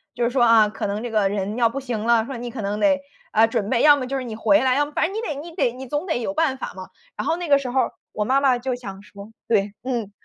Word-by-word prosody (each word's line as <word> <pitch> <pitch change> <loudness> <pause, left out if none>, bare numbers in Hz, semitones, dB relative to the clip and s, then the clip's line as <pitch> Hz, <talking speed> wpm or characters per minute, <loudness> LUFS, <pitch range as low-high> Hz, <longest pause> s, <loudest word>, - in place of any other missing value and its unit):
就 240 - -1
是 235 - +1
说 250 -1 +2
啊， 225 -2 +6
可 210 - -4
能 205 +2 -3
这 240 - -4
个 210 -3 +2
人 200 +1 -2
要 235 -1 +3
不 275 - -4
行 245 -5 -4
了， 230 -1 +3
说 270 - -6
你 240 +1 -5
可 230 - -6
能 205 +1 -2
得， 285 +1 +3 0.3
呃， 225 +1 +5
准 225 -3 -2
备 240 -2 +2
要 295 -1 +8
么 260 -3 -4
就 275 +1 -2
是 260 - -3
你 230 -3 -6
回 295 +7 +3
来， 255 -1 +3
要 290 +1 +2
么 - - -12
反 - - +2
正 365 - -4
你 435 - -2
得 310 -10 -3
你 335 +3 -8
得 240 - +1
你 255 +2 -9
总 295 +6 -2
得 320 - 0
有 245 +5 -3
办 305 -4 +1
法 - - -6
嘛。 185 0 -9 0.3
然 - - -4
后 330 - +1
那 350 -1 -4
个 280 -2 +5
时 265 -2 -5
候 260 +1 +1 0.2
我 210 - -2
妈 265 +4 +2
妈 265 -3 +3
就 255 +1 -3
想 195 -6 -9
说， 205 +1 -12 0.2
对， 205 -3 +1
嗯， 240 -5 -3
245 Hz, 335 characters per minute, -22 LUFS, 215-275 Hz, 0.3 s, 要